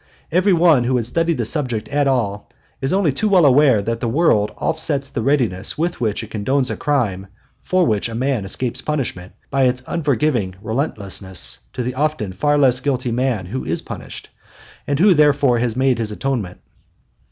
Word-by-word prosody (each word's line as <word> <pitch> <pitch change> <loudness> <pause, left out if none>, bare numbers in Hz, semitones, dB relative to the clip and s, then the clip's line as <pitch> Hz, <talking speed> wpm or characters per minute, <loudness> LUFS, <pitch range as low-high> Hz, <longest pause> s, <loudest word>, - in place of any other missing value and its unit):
Every 185 +5 +3
one 165 -8 +4
who 130 +1 +1
has 115 -2 -1
studied 165 +4 0
the 120 - -1
subject 120 -5 -2
at 145 0 +1
all 105 -6 -1 0.3
is 135 - -1
only 190 -5 +2
too 210 +11 -1
well 185 -5 +5
aware 135 -6 +5
that 115 +2 -2
the 120 - -2
world 115 -7 +2
offsets 145 -4 0
the - - -3
readiness 115 -8 0
with 170 -2 -2
which 110 -1 -1
it 110 - -11
condones 130 +5 0
a - - -2
crime 110 -10 -1 0.3
for 185 -1 +1
which 110 0 0
a 115 - -6
man 130 -2 -1
escapes 120 +6 -2
punishment, 120 -12 -4 0.2
by 135 -1 +2
its 125 +1 0
unforgiving 140 - 0
relentlessness 100 - -3
to 125 - -3
the 125 +1 -3
often 140 -8 -1
far 145 +10 +1
less 130 -3 +3
guilty 130 -2 -1
man 120 -5 -1
who 120 +9 -5
is - - -1
punished, - - -8 0.6
and 140 - 0
who 195 +2 +6
therefore 145 -5 +3
has 120 -2 -1
made 130 -1 +1
his 110 -2 -1
atonement. 110 -6 -3
130 Hz, 185 wpm, -19 LUFS, 110-145 Hz, 0.6 s, who